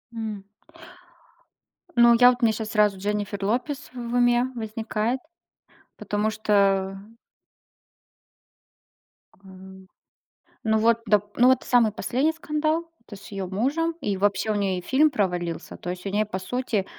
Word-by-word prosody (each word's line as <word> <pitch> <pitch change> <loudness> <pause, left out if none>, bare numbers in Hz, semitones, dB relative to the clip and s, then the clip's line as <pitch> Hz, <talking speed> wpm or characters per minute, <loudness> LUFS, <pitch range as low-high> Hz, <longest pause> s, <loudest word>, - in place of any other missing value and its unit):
М. 215 -3 -5 1.5
Ну 235 -1 +7
я 245 0 +8
вот, 250 0 0
у - - +4
меня 220 - +3
щас 220 0 -5
сразу 210 -2 +3
Дженнифер 205 0 -3
Лопес 250 +7 -2
в - - -12 0.2
уме 245 0 +3
возникает, 220 +1 -2 0.8
потому 210 +1 -1
что. 195 -3 +1 2.5
М. 190 0 -14 0.8
Ну, 220 0 +2
вот, 230 +1 +3
доп 205 0 +1
ну, 245 - +5
вот, 260 0 +4
самый 235 -3 +3
последний 260 +10 0
скандал, 310 0 -1 0.2
то - - -11
есть 195 -1 -11
с - - -12
её 195 -2 -4
мужем, 280 - -1
и 205 -7 -1
вообще 205 +2 +1
у - - -1
неё 195 -2 0
и - - -5
фильм 275 - +3
провалился. 180 - -3
То 175 - -7
есть, 180 +1 -6
у - - -2
неё, 210 +2 0
по 200 -3 -5
сути, 230 -1 -2
215 Hz, 150 wpm, -24 LUFS, 195-245 Hz, 2.5 s, я